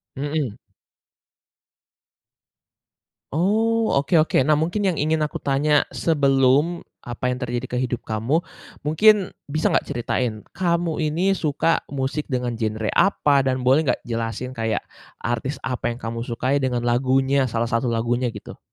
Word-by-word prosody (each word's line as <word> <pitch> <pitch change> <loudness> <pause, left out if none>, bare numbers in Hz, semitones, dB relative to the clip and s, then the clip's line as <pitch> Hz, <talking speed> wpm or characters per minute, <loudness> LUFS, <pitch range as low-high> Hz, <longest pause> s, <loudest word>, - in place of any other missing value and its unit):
Mhm. 145 -4 -2 2.8
Oh, 220 +6 +2
oke 145 +6 -1
oke, 155 - +1
nah 155 - +4
mungkin 175 +7 0
yang 180 -4 +1
ingin 155 0 +1
aku - - -6
tanya 145 +2 +3
sebelum 140 +2 +2 0.2
apa 120 +1 -3
yang - - -5
terjadi 120 +1 -2
ke - - 0
hidup 125 -2 -2
kamu, 115 +8 0 0.5
mungkin 200 +6 +4 0.2
bisa 155 +2 +1
nggak - - +2
ceritain, 120 -2 -2
kamu 170 -2 0
ini 170 +6 +1
suka 160 -1 +1
musik 140 +2 -3
dengan 125 -2 -1
genre 110 -1 -2
apa 150 -7 +3
dan 130 -1 -1
boleh 135 +2 +4
nggak - - 0
jelasin 115 +2 -3
kayak 110 -3 -1 0.4
artis 120 +4 -3
apa 125 -1 -2
yang 120 - -4
kamu 115 0 -4
sukai 130 +4 -1
dengan 125 -2 -1
lagunya, 130 +2 +2
salah 115 +1 -1
satu 115 +1 0
lagunya 120 +2 0
gitu? - - -10
135 Hz, 140 wpm, -22 LUFS, 120-155 Hz, 2.8 s, nah